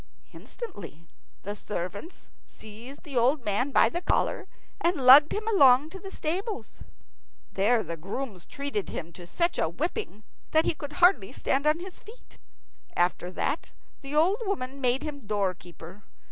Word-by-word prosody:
Instantly 200 - -9 0.4
the 205 +2 -4
servants 205 - -6
seized 225 +6 -11
the 295 -6 -7
old 250 +3 +2
man 210 +6 0
by - - +5
the 345 - -3
collar 360 - 0 0.3
and 345 +2 +2
lugged 270 +3 +8
him 430 +1 -3
along 285 - +5
to 385 - -8
the 390 +1 -8
stables. 385 +6 -4 0.7
There 215 +4 +2
the 170 -2 -6
grooms 195 +2 -6
treated 280 -8 -4
him 170 0 -6
to 175 0 -11
such 340 - 0
a - - +1
whipping 300 - -4 0.3
that 315 +1 +4
he - - +2
could 295 -1 -8
hardly 320 - +4
stand 275 +2 0
on 305 +2 +3
his 365 +1 -8
feet. 450 +4 -16 0.6
After 175 0 0
that 185 - -2 0.3
the 280 +1 -5
old 345 +7 +4
woman 275 - -3
made 255 +1 +2
him 285 -7 -7
doorkeeper. 185 -2 -4
270 Hz, 155 wpm, -27 LUFS, 205-330 Hz, 0.7 s, lugged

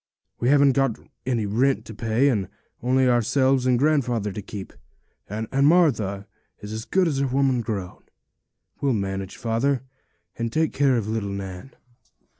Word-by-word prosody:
We 120 - +1
haven't 140 -1 +5
got 135 -4 +1 0.3
any 120 -4 0
rent 125 +7 +1
to 110 - -9
pay, 115 +5 +1
and 100 -8 -1 0.3
only 130 +1 +2
ourselves 130 +2 +2
and 125 -1 +4
grandfather 125 -7 +1
to 105 - -6
keep, 100 0 -8 0.6
and 110 +2 -4 0.2
Martha 115 - +2 0.3
is 105 0 -7
as 110 +1 -5
good 185 -2 +2
as 140 -4 0
a 140 - +1
woman 130 -1 +1
grown. 100 -5 -5 0.8
We'll 140 -2 +2
manage, 95 -2 -3
father, 120 +4 0 0.6
and 115 -1 -2
take 160 +3 +1
care 135 -3 +3
of 110 -3 -2
little 110 -2 -2
Nan.' 100 +4 -7
120 Hz, 155 wpm, -24 LUFS, 105-135 Hz, 0.8 s, haven't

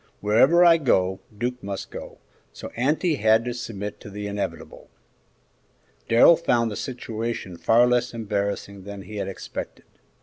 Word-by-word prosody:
Wherever 130 +12 +5
I 170 -1 +7
go, 95 - +1 0.2
Duke 125 +2 -3
must 100 -1 -6
go, - - -9 0.4
so - - -8
auntie 150 +6 +1
had 110 +1 +3
to 120 - -2
submit 105 -4 -6
to - - -11
the 105 +1 -6
inevitable." 100 0 -5 1.2
Darrell 120 +8 +7
found 120 -9 +1
the - - -5
situation 115 -6 -5
far 115 +7 +4
less 125 0 +1
embarrassing 100 -3 -3
than 100 -1 -8
he 105 +1 -9
had - - -3
expected. 95 - -7
115 Hz, 145 wpm, -24 LUFS, 100-125 Hz, 1.2 s, I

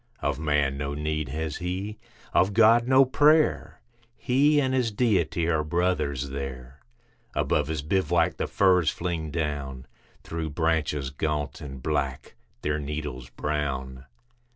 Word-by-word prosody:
Of - - -1
man 75 -3 +1
no 70 0 -3
need 75 -1 -2
has 80 +1 -3
he, 95 +4 -4 0.3
of 95 +3 +3
God, 115 +1 +5
no 135 +1 +6
prayer; 150 +4 +3 0.4
He 145 +4 +3
and 130 -2 +1
his 125 -3 +2
Deity 90 -8 +1
are 80 -2 +1
brothers 75 -4 0
there. 70 -1 -7 0.6
Above - - +1
his 80 -2 -3
bivouac 85 0 +1
the - - -2
firs 90 -4 +3
fling 85 -3 -3
down 70 -4 -3 0.4
Through 80 -1 -4
branches 75 -3 0
gaunt 75 0 -3
and 70 -3 -8
black, 70 -4 -2 0.3
their 75 0 0
needles 70 -4 -5
brown. 65 -3 -3
75 Hz, 130 wpm, -26 LUFS, 70-90 Hz, 0.6 s, no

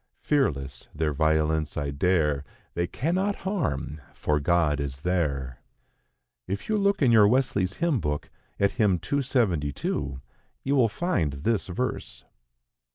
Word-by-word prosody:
Fearless, 70 - 0
their 75 -1 0
violence 80 0 +1
I 70 -1 -1
dare; 75 -2 +1 0.3
They 85 0 -1
cannot 180 - 0
harm, 80 - -2
for 75 -1 0
God 75 -1 +2
is 70 -1 -4
there." 70 -8 -1 0.9
If 100 +2 -4
you 215 -1 +1
look 200 -5 +2
in 125 - +5
your 110 -3 +7
Wesley's 105 -6 +1
Hymn 165 -3 +1
Book, 75 -4 -3 0.3
at 100 0 +3
hymn 105 -7 +2
272, 85 - -1 0.4
you 140 +1 +1
will 120 -5 +4
find 115 - 0
this 95 +10 -1
verse. 125 +8 -4
90 Hz, 130 wpm, -26 LUFS, -, 0.9 s, your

